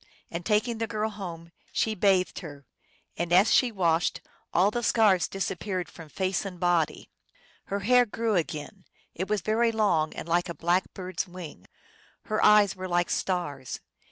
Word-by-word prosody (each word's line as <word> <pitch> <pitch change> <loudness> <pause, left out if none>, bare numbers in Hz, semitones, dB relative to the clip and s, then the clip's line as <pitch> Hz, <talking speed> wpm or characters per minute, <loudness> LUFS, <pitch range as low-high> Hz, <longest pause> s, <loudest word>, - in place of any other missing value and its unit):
And, 170 +1 -4
tak 210 +4 +2
ing 235 -2 -3
the 225 - -1
girl 215 0 -2
home, 170 -5 -8 0.2
she 220 - 0
bathed 190 -2 +2
her, 145 -4 -10 0.5
and 170 0 -2
as 190 +5 +5
she 250 -2 +4
washed 170 -5 +1 0.3
all 190 +4 +3
the 240 - -2
scars 215 -6 +3
disappeared 190 -1 -3
from 165 -3 -12
face 185 +4 -1
and 185 -3 -7
body. 175 -3 0 0.5
Her 200 +1 -3
hair 245 +4 +4
grew 225 +1 -1
again; 170 +1 -3 0.3
it 185 +3 -4
was 210 -2 +1
very 230 +4 +2
long, 185 -8 +1
and - - -6
like 175 +1 +1
a 170 - -5
black 175 +2 +1
bird 185 -1 -7
s - - 0
wing. 180 -3 -10 0.6
Her 215 - -1
eyes 210 -2 +6
were 185 0 -5
like 175 -1 +1
stars. 145 -9 -2
185 Hz, 175 wpm, -27 LUFS, 170-210 Hz, 0.6 s, eyes